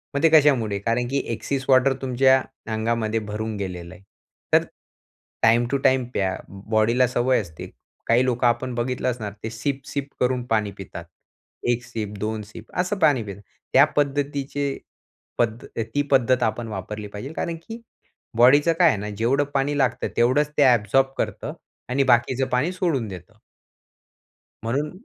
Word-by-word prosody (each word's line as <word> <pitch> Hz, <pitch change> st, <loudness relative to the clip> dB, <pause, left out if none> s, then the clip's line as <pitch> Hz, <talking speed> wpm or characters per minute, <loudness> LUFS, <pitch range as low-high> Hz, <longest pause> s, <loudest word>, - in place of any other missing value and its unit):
मग 140 Hz, -, -1 dB
ते 165 Hz, -, +7 dB
कशामुळे? 130 Hz, -10 st, +4 dB
कारण 115 Hz, +4 st, 0 dB
की 140 Hz, -, +1 dB
ॲक्सेस 135 Hz, +4 st, -3 dB
वॉटर 135 Hz, +1 st, +5 dB
तुमच्या 130 Hz, 0 st, +4 dB, 0.3 s
अंगामध्ये 110 Hz, 0 st, 0 dB
भरून 110 Hz, +1 st, -4 dB
गेलेलं 90 Hz, -3 st, -6 dB
आहे. 95 Hz, -, -16 dB, 0.5 s
तर 160 Hz, +1 st, +6 dB, 0.8 s
टाईम 115 Hz, +2 st, +4 dB
टू 140 Hz, -, +2 dB
टाईम 130 Hz, -1 st, +3 dB
प्या 95 Hz, -1 st, 0 dB, 0.4 s
बॉडीला 115 Hz, +4 st, +3 dB
सवय 125 Hz, +1 st, +2 dB
असते. 85 Hz, -6 st, -10 dB, 0.4 s
काही 120 Hz, +2 st, +4 dB
लोकं 125 Hz, -1 st, +1 dB
आपण 120 Hz, +2 st, 0 dB
बघितलं 125 Hz, +1 st, -1 dB
असणार 110 Hz, -4 st, -6 dB
ते 110 Hz, -, -3 dB
सिप-सिप 140 Hz, +4 st, -4 dB
करून 125 Hz, -1 st, +1 dB
पाणी 110 Hz, -4 st, 0 dB
पितात. 85 Hz, -3 st, -8 dB, 0.6 s
एक 120 Hz, 0 st, +1 dB
सिप 110 Hz, -4 st, -5 dB
दोन 110 Hz, +1 st, -2 dB
सिप 105 Hz, -, -13 dB
असं 185 Hz, +3 st, 0 dB
पाणी 145 Hz, -8 st, +3 dB
पितात. 100 Hz, -1 st, -8 dB, 0.3 s
त्या -, -, +8 dB
पद्धतीचे 140 Hz, -1 st, -1 dB, 0.6 s
पद्धत 115 Hz, 0 st, -1 dB, 0.3 s
ती 145 Hz, -, +3 dB
पद्धत 130 Hz, -2 st, +3 dB
आपण 115 Hz, +2 st, -1 dB
वापरली 105 Hz, 0 st, -6 dB
पाहिजे. 105 Hz, +8 st, -8 dB
कारण 170 Hz, +1 st, -3 dB
की 230 Hz, +1 st, -7 dB, 0.6 s
बॉडीचं 145 Hz, +7 st, +6 dB
काय 175 Hz, -, +7 dB
आहे 130 Hz, -, +1 dB
ना, 105 Hz, +1 st, -5 dB
जेवढं 130 Hz, +6 st, +2 dB
पाणी 140 Hz, +1 st, 0 dB
लागतं, 135 Hz, -4 st, +1 dB
तेवढंच 130 Hz, +5 st, +3 dB
ते 145 Hz, -, +6 dB
ॲबसॉर्ब 125 Hz, +1 st, +4 dB
करतं -, -, -3 dB, 0.4 s
आणि 135 Hz, +2 st, +2 dB
बाकीचं 130 Hz, +1 st, +2 dB
पाणी 130 Hz, +6 st, 0 dB
सोडून 165 Hz, -10 st, -1 dB
देतं. 95 Hz, +3 st, -10 dB, 1.3 s
म्हणून 140 Hz, +7 st, -1 dB
125 Hz, 155 wpm, -23 LUFS, 110-135 Hz, 1.3 s, त्या